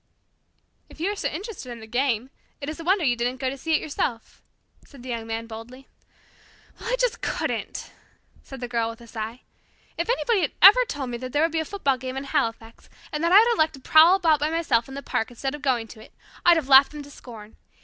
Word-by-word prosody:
"If - - -16
you 365 +5 0
are - - -4
so - - -2
interested 375 - -7
in 235 - -8
the 220 - -10
game, 245 +1 -1 0.3
it 280 - -6
is 310 - -7
a - - -6
wonder 370 0 +2
you 245 -3 +2
didn't 245 +2 -2
go 260 -1 -1
to - - -6
see 320 +4 0
it - - 0
yourself," 260 -6 -4 0.4
said 275 -4 -15
the 255 - -8
Young 230 -2 -4
Man 225 0 -4
boldly. 230 +4 -11 0.9
"Well, 470 - -5
I - - +3
just - - 0
couldn't," - - -3 0.5
said 270 -2 -11
the 245 - -3
Girl 230 -1 -1
with 230 - -9
a - - -12
sigh. 225 +1 -6 0.6
"If 340 - -2
anybody 475 -4 +1
had 300 - -1
ever 420 +7 +8
told 275 - -5
me 240 - -3
that 255 0 -7
there 295 - +2
would 330 - +1
be 325 - -1
a 320 - -2
football 280 -9 -1
game 260 +1 -5
in 270 - -4
Halifax, 225 -4 -3 0.2
and 300 +1 -3
that 335 - +2
I 380 - +8
would 470 +1 +3
elect 315 -8 +1
to - - -13
prowl 315 +7 +6
about 325 -6 +3
by 300 +1 0
myself 320 -8 +1
in 270 - -8
the 280 - -6
park 225 - -2
instead 265 +3 -4
of 295 - -7
going 250 -5 0
to 215 - -12
it, - - -19 0.3
I'd 345 -1 +6
have 305 -5 -2
laughed 275 +1 +7
them 295 -1 -7
to 285 - -14
scorn. 220 -5 -12
270 Hz, 245 wpm, -24 LUFS, 240-325 Hz, 0.9 s, ever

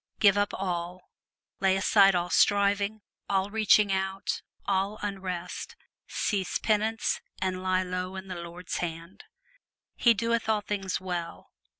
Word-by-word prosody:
Give 200 -2 +6
up 205 0 +1
all, 180 -1 -4 0.5
lay 190 0 +3
aside 195 0 +5
all 175 0 -1
striving, 205 +1 +3 0.3
all 195 0 +1
reaching 210 -2 +4
out, 190 0 -2 0.2
all 195 +2 0
unrest, 190 - -4 0.3
cease 195 -4 -1
penance 220 +1 0 0.2
and 185 -1 -1
lie 185 0 +1
low 185 +1 -4
in 190 0 -7
the 185 - -5
Lord's 170 +2 -6
hand. 170 +2 -6 0.7
He 235 -2 +4
doeth 230 +1 0
all 215 -1 +2
things 195 -2 -2
well. 175 -3 -5
195 Hz, 130 wpm, -28 LUFS, 185-205 Hz, 0.7 s, Give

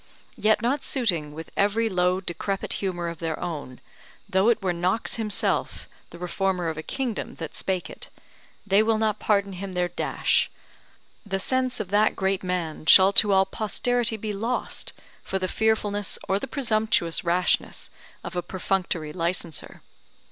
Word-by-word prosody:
yet 215 +1 +2
not 265 +4 +1
suiting 175 - +1
with 160 +2 -9
every 210 +3 +2
low 180 -2 +2
decrepit 195 +2 -2
humour 175 -3 -2
of 170 -2 -5
their 165 -1 -3
own, 150 -7 -5 0.5
though 190 +4 +3
it 235 - +3
were 185 -2 0
Knox 180 +8 0
himself, 215 -2 -1 0.2
the - - -11
reformer 180 0 -1
of 160 - -5
a - - -2
kingdom, 245 - -4
that 165 -3 -6
spake 185 -2 -2
it, - - -10 0.6
they 200 +1 +4
will 220 0 +2
not 215 -1 0
pardon 200 -2 +1
him 190 +1 -6
their 180 -1 0
dash: - - +1 0.7
the 195 -2 -2
sense 255 +4 0
of 205 -4 -4
that 210 +2 +3
great 190 0 0
man 180 -4 -3
shall 190 +3 +8
to 205 0 +7
all 190 0 +5
posterity 230 +3 +1
be 215 0 -4
lost, 225 +5 -2 0.3
for 195 - -3
the 185 -1 -1
fearfulness 205 -1 0
or 195 +1 +1
the 270 - -5
presumptuous 220 - +1
rashness 175 +1 +1 0.3
of - - -7
a 175 - 0
perfunctory 175 -3 -2
licenser. 170 -2 -3
195 Hz, 160 wpm, -25 LUFS, 175-215 Hz, 0.7 s, shall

